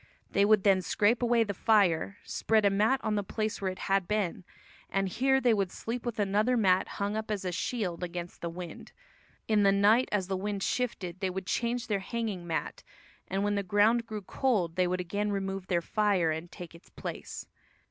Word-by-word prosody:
They 200 Hz, -, +3 dB
would 210 Hz, -2 st, +4 dB
then 195 Hz, -2 st, +4 dB
scrape 210 Hz, +6 st, +2 dB
away 240 Hz, -1 st, +3 dB
the 205 Hz, -2 st, -3 dB
fire, 200 Hz, -2 st, +2 dB
spread 220 Hz, -2 st, +1 dB
a 200 Hz, -, +5 dB
mat 215 Hz, +7 st, +2 dB
on 215 Hz, -, 0 dB
the 205 Hz, -, +1 dB
place 215 Hz, +2 st, -3 dB
where 190 Hz, -, 0 dB
it 185 Hz, -, -9 dB
had 195 Hz, -2 st, +1 dB
been, 200 Hz, -3 st, -1 dB, 0.5 s
and 195 Hz, 0 st, 0 dB
here 265 Hz, +7 st, +2 dB
they 245 Hz, -3 st, +3 dB
would 195 Hz, -3 st, 0 dB
sleep 240 Hz, +2 st, -5 dB
with 235 Hz, -, -3 dB
another 210 Hz, +4 st, +2 dB
mat 190 Hz, -4 st, +3 dB
hung 200 Hz, +1 st, -1 dB
up 220 Hz, 0 st, -4 dB
as 205 Hz, -3 st, -2 dB
a 180 Hz, -, -1 dB
shield 180 Hz, -1 st, -2 dB
against 175 Hz, 0 st, -6 dB
the 170 Hz, -, -3 dB
wind. 175 Hz, +1 st, -9 dB, 0.5 s
In 215 Hz, -2 st, +3 dB
the 200 Hz, -1 st, +5 dB
night, 210 Hz, +5 st, +4 dB
as 205 Hz, -3 st, +1 dB
the 190 Hz, -, -1 dB
wind 200 Hz, +1 st, -3 dB
shifted, 190 Hz, -8 st, -2 dB
they 190 Hz, -1 st, -1 dB
would 190 Hz, +1 st, -5 dB
change 235 Hz, +4 st, -1 dB
their 205 Hz, -2 st, 0 dB
hanging 205 Hz, -4 st, -4 dB
mat, 165 Hz, -, -3 dB, 0.5 s
and 195 Hz, +1 st, -1 dB
when 205 Hz, 0 st, +1 dB
the 200 Hz, -, 0 dB
ground 210 Hz, +5 st, +3 dB
grew 215 Hz, -2 st, -5 dB
cold 190 Hz, -6 st, 0 dB
they 180 Hz, -1 st, +2 dB
would 180 Hz, +1 st, -1 dB
again 205 Hz, +4 st, -2 dB
remove 195 Hz, -1 st, -3 dB
their 175 Hz, -2 st, 0 dB
fire 200 Hz, -6 st, +2 dB
and 160 Hz, +2 st, -5 dB
take 175 Hz, -2 st, -9 dB
its 170 Hz, -, -16 dB
place. -, -, -7 dB
200 Hz, 210 wpm, -29 LUFS, 185-220 Hz, 0.5 s, a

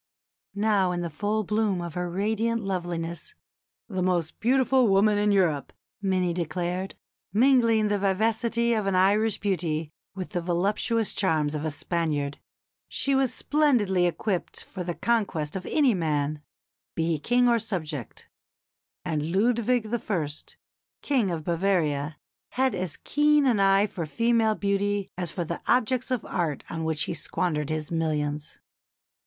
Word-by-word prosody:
Now 200 Hz, -3 st, +2 dB
in 175 Hz, 0 st, -2 dB
the 170 Hz, -1 st, -4 dB
full 210 Hz, +7 st, -1 dB
bloom 210 Hz, -2 st, 0 dB
of 170 Hz, -2 st, -5 dB
her 180 Hz, 0 st, -3 dB
radiant 220 Hz, +5 st, 0 dB
loveliness 175 Hz, -3 st, -4 dB, 0.5 s
"the 190 Hz, -4 st, -3 dB
most 175 Hz, -3 st, 0 dB
beautiful 260 Hz, +1 st, +3 dB
woman 205 Hz, +1 st, +4 dB
in 210 Hz, 0 st, +2 dB
Europe" 170 Hz, -8 st, +1 dB, 0.3 s
many 185 Hz, -3 st, +1 dB
declared 175 Hz, +3 st, -3 dB, 0.4 s
mingling 230 Hz, -1 st, +4 dB
the 205 Hz, -1 st, 0 dB
vivacity 225 Hz, +4 st, +1 dB
of 215 Hz, -3 st, 0 dB
an 195 Hz, -, +1 dB
Irish 205 Hz, +3 st, +3 dB
beauty 165 Hz, -6 st, -1 dB, 0.2 s
with 185 Hz, -2 st, -6 dB
the 175 Hz, -, -1 dB
voluptuous 200 Hz, +6 st, 0 dB
charms 155 Hz, -6 st, +1 dB
of 150 Hz, 0 st, -3 dB
a -, -, 0 dB
Spaniard 150 Hz, -2 st, -2 dB, 0.5 s
she 275 Hz, -, 0 dB
was 265 Hz, -2 st, +2 dB
splendidly 225 Hz, -12 st, +2 dB
equipped 180 Hz, +1 st, -2 dB
for 185 Hz, -, -7 dB
the 175 Hz, -1 st, -3 dB
conquest 190 Hz, -7 st, -1 dB
of 185 Hz, -, -5 dB
any 280 Hz, -6 st, +3 dB
man, 150 Hz, -4 st, -1 dB, 0.5 s
be 165 Hz, -, 0 dB
he 165 Hz, -2 st, 0 dB
King 245 Hz, +8 st, +3 dB
or 235 Hz, -1 st, +4 dB
subject; 155 Hz, -, -5 dB, 0.8 s
and 155 Hz, -2 st, -2 dB
Ludwig 235 Hz, +4 st, +2 dB
I., 205 Hz, -9 st, -1 dB, 0.8 s
King 255 Hz, -9 st, +1 dB
of 165 Hz, -3 st, -3 dB
Bavaria, 165 Hz, -4 st, 0 dB, 0.4 s
had 260 Hz, -1 st, +2 dB
as 185 Hz, -4 st, -1 dB
keen 295 Hz, 0 st, +3 dB
an 240 Hz, -6 st, +3 dB
eye 195 Hz, +1 st, +4 dB
for 175 Hz, -6 st, -5 dB
female 230 Hz, +3 st, +2 dB
beauty 200 Hz, 0 st, -1 dB
as 175 Hz, -2 st, -3 dB
for 175 Hz, -, -2 dB
the 170 Hz, +1 st, -5 dB
objects 255 Hz, +1 st, +2 dB
of 255 Hz, -4 st, -1 dB
art 165 Hz, -5 st, -2 dB
on 165 Hz, -1 st, -3 dB
which 160 Hz, -1 st, 0 dB
he 170 Hz, -, -3 dB
squandered 155 Hz, -3 st, -2 dB
his 155 Hz, 0 st, -3 dB
millions. 150 Hz, -2 st, -2 dB
190 Hz, 150 wpm, -26 LUFS, 165-220 Hz, 0.8 s, woman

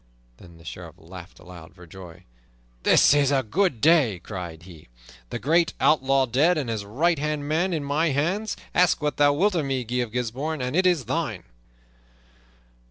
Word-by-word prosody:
Then 85 Hz, -2 st, -16 dB
the 80 Hz, -, -18 dB
Sheriff 85 Hz, 0 st, -9 dB
laughed 90 Hz, +1 st, -13 dB
aloud 90 Hz, -1 st, -14 dB
for 90 Hz, -1 st, -14 dB
joy. 90 Hz, -1 st, -13 dB, 0.6 s
"This -, -, +5 dB
is 145 Hz, -1 st, +2 dB
a 135 Hz, -2 st, +1 dB
good 150 Hz, -, -1 dB
day!" 150 Hz, -, +4 dB
cried 85 Hz, -3 st, -8 dB
he. 85 Hz, -4 st, -14 dB, 0.4 s
"The -, -, -4 dB
great 165 Hz, +4 st, +1 dB
outlaw 135 Hz, -2 st, +3 dB
dead 145 Hz, +9 st, +2 dB
and 135 Hz, -6 st, -2 dB
his 110 Hz, -2 st, -3 dB
right 150 Hz, +11 st, 0 dB
hand 150 Hz, -1 st, -3 dB
man 170 Hz, +5 st, 0 dB
in 160 Hz, -4 st, -2 dB
my 145 Hz, +4 st, 0 dB
hands! 175 Hz, +10 st, -1 dB, 0.2 s
Ask 175 Hz, -3 st, +2 dB
what 150 Hz, -, -1 dB
thou 145 Hz, 0 st, +4 dB
wilt 195 Hz, +8 st, +1 dB
of 165 Hz, -4 st, 0 dB
me, 135 Hz, -2 st, -2 dB
Guy 120 Hz, +2 st, -4 dB
of 120 Hz, -3 st, -2 dB
Gisbourne, 125 Hz, +6 st, -3 dB
and 125 Hz, +2 st, -3 dB
it 185 Hz, +1 st, +3 dB
is 170 Hz, -8 st, +1 dB
thine!" 130 Hz, -, -3 dB
135 Hz, 180 wpm, -24 LUFS, 95-155 Hz, 0.6 s, This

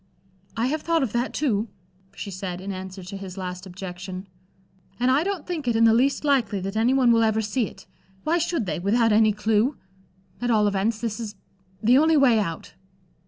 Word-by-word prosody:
"I 230 Hz, -, +1 dB
have 300 Hz, +4 st, -1 dB
thought 330 Hz, -2 st, +1 dB
of 245 Hz, -, -2 dB
that, 240 Hz, +2 st, 0 dB
too," 230 Hz, -7 st, 0 dB, 0.5 s
she 200 Hz, -, -6 dB
said, 185 Hz, -1 st, -5 dB
in 195 Hz, +2 st, -5 dB
answer 190 Hz, 0 st, -7 dB
to 195 Hz, +2 st, -7 dB
his 195 Hz, -1 st, -8 dB
last 180 Hz, 0 st, -5 dB
objection, 185 Hz, +1 st, -7 dB, 0.7 s
"and 250 Hz, +1 st, +3 dB
I 280 Hz, +4 st, +3 dB
don't 385 Hz, -4 st, -3 dB
think 325 Hz, -7 st, -4 dB
it 235 Hz, -, +2 dB
in 225 Hz, -, +4 dB
the 225 Hz, -1 st, +6 dB
least 265 Hz, +6 st, +2 dB
likely 245 Hz, -9 st, +2 dB
that 195 Hz, +2 st, -4 dB
any 225 Hz, +3 st, +3 dB
one 260 Hz, -3 st, +4 dB
will 230 Hz, -1 st, +4 dB
ever 220 Hz, -1 st, +2 dB
see 220 Hz, +2 st, -1 dB
it. -, -, -14 dB, 0.4 s
Why 335 Hz, +3 st, +1 dB
should 330 Hz, -7 st, -1 dB
they, 160 Hz, -4 st, -2 dB
without 225 Hz, +5 st, +2 dB
any 215 Hz, 0 st, +5 dB
clue? 215 Hz, +5 st, +1 dB, 0.6 s
At 245 Hz, -, -1 dB
all 215 Hz, -3 st, +3 dB
events, 205 Hz, +3 st, 0 dB
this 230 Hz, -1 st, -3 dB
is 215 Hz, -3 st, -6 dB, 0.5 s
the 245 Hz, +5 st, +6 dB
only 315 Hz, +1 st, +4 dB
way 250 Hz, -6 st, +5 dB
out." 165 Hz, -6 st, -4 dB
220 Hz, 205 wpm, -24 LUFS, 195-255 Hz, 0.7 s, the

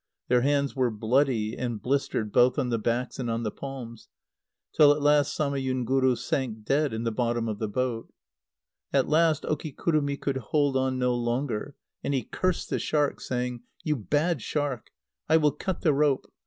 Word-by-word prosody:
Their 125 Hz, 0 st, +4 dB
hands 140 Hz, +1 st, +1 dB
were 130 Hz, -2 st, +2 dB
bloody 115 Hz, 0 st, +1 dB
and 120 Hz, -4 st, -3 dB
blistered 125 Hz, -5 st, -1 dB
both 125 Hz, +4 st, +4 dB
on 130 Hz, -4 st, 0 dB
the 115 Hz, -1 st, 0 dB
backs 120 Hz, +4 st, -2 dB
and 120 Hz, -2 st, -2 dB
on 115 Hz, +1 st, -1 dB
the 105 Hz, -, -2 dB
palms, 125 Hz, -5 st, -8 dB, 0.6 s
till 150 Hz, -2 st, +7 dB
at 145 Hz, -, -3 dB
last 145 Hz, 0 st, +3 dB
Samayunguru 130 Hz, -2 st, +1 dB
sank 115 Hz, -3 st, -3 dB
dead 145 Hz, +3 st, +2 dB
in 110 Hz, +1 st, -3 dB
the 115 Hz, -, 0 dB
bottom 120 Hz, 0 st, -1 dB
of 105 Hz, -2 st, -3 dB
the 110 Hz, -, -1 dB
boat. 120 Hz, +1 st, -2 dB, 0.8 s
At 135 Hz, -2 st, +2 dB
last 155 Hz, -1 st, +3 dB
Okikurumi 150 Hz, -1 st, -1 dB
could 140 Hz, -2 st, -1 dB
hold 140 Hz, +3 st, 0 dB
on 130 Hz, 0 st, +1 dB
no 125 Hz, -1 st, +1 dB
longer, 120 Hz, +1 st, -2 dB, 0.3 s
and 140 Hz, -, 0 dB
he 130 Hz, -, 0 dB
cursed 185 Hz, -2 st, -2 dB
the -, -, 0 dB
shark, 150 Hz, -2 st, 0 dB
saying: 125 Hz, -1 st, -3 dB, 0.2 s
"You 155 Hz, -1 st, +1 dB
bad 145 Hz, -, 0 dB
shark! 145 Hz, -2 st, -3 dB, 0.4 s
I 160 Hz, -, +6 dB
will 150 Hz, -2 st, +3 dB
cut 190 Hz, +4 st, -4 dB
the 155 Hz, -, +3 dB
rope. 140 Hz, -1 st, +2 dB
130 Hz, 175 wpm, -27 LUFS, 120-145 Hz, 0.8 s, till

